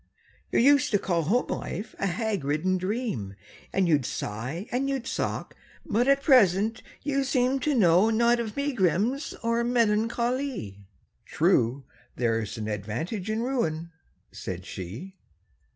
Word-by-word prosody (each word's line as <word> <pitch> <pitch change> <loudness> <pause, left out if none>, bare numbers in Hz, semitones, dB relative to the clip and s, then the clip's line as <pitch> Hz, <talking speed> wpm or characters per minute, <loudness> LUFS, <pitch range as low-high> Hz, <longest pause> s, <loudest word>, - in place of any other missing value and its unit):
—"You - - +1
used 280 +2 +5
to - - +6
call 175 -4 0
home 215 +11 +1
life 205 +6 -4
a 195 - 0
hag 205 - -1
ridden 155 +7 0
dream, 185 - -3 0.4
And 190 -2 +2
you'd 150 -5 +3
sigh, 125 - -4
and 265 +3 0
you'd 270 -3 -2
sock; - - -3 0.3
but 240 +4 +1
at 275 0 +3
present 220 - +4 0.2
you 275 -1 0
seem 260 0 +1
To 290 +2 0
know 185 -1 +5
not 235 +2 +3
of 225 0 -4
megrims 245 - 0
or 230 +1 +1
melancho 235 +1 +1
ly!"— 100 - -6 0.4
"True. 120 +4 +2 0.3
There's 115 -2 -1
an 110 -1 -4
advantage 115 - -4
in 220 +2 -1
ruin," 170 -11 -1 0.4
said 90 0 -6
she. 115 - -8
210 Hz, 140 wpm, -27 LUFS, 155-245 Hz, 0.4 s, to